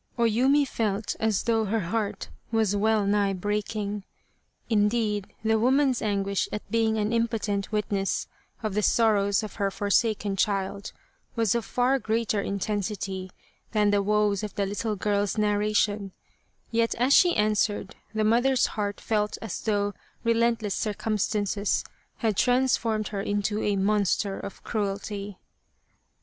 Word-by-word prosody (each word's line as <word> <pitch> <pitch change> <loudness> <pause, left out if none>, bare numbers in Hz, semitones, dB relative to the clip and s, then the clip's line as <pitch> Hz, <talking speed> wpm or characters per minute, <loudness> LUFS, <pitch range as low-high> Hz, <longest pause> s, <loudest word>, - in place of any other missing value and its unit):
O 235 - +2
Yumi 265 +6 +3
felt 215 -3 -1
as 220 -3 +1
though 225 -2 +1
her 220 +2 0
heart 200 +3 -3 0.2
was 220 -3 +2
well 215 0 +2
nigh 200 -1 +2
break 205 +3 -2
ing. 205 -1 -3 0.6
Indeed, 210 -2 +1 0.2
the 220 0 +2
woman's 260 +2 +3
anguish 200 -2 0
at 210 - -5
being 225 -1 +2
an 210 +1 0
im 230 0 +2
potent 205 -3 -2
witness 205 -2 -1 0.4
of 215 -2 -1
the 210 - +1
sorrows 205 -2 +3
of 215 - -7
her 200 -2 +1
forsaken 205 0 0
child 200 -1 -1 0.4
was 225 -4 +2
of 235 -3 -1
far 255 +2 +1
greater 220 -2 0
intensity 195 -1 -3 0.4
than 210 -1 +3
the 205 0 +3
woes 210 -1 +2
of 210 -1 -6
the 200 - 0
little 210 +2 -2
girl's 205 +1 0
narration, 210 -1 +1 0.6
yet 230 0 +1
as 250 +4 +3
she 350 +2 +6
answered, 210 -2 0 0.2
the 220 0 0
mother's 245 +4 +3
heart 205 -1 -2
felt 210 -1 -1
as 225 -5 -5
though 205 -2 0 0.3
relentless 230 -3 +1
circumstances 210 -1 -1 0.3
had 220 -3 0
transformed 235 -3 +2
her 200 -2 -3
into 205 +1 -1
a 205 - +1
monster 200 0 +1
of 200 - -8
cruelty 200 -2 -3
210 Hz, 140 wpm, -26 LUFS, 200-225 Hz, 0.6 s, she